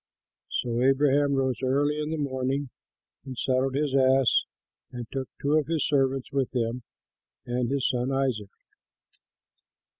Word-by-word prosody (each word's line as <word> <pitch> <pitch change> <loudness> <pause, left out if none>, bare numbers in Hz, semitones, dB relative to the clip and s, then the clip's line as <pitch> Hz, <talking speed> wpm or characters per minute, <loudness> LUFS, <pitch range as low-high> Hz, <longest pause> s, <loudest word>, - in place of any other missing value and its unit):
Taylor] 120 -1 -2
So - - +2
Abraham 140 +1 +3
rose 130 -3 0
early 145 +3 +1
in 150 - -3
the 160 - -2
morning 135 -1 -2 0.5
and 130 -2 -8
saddled 130 +1 0
his 145 -1 0
ass 135 -1 +4 0.5
and 120 -1 -6
took 135 -1 -4
two 140 +1 0
of 145 - -4
his 160 -3 0
servants 135 -2 +1
with 135 -2 -1
him, 120 +1 -1 0.6
and 120 0 -1
his 140 -2 +1
son 125 +1 -1
Isaac. 130 -7 -1
135 Hz, 145 wpm, -27 LUFS, 130-140 Hz, 0.6 s, ass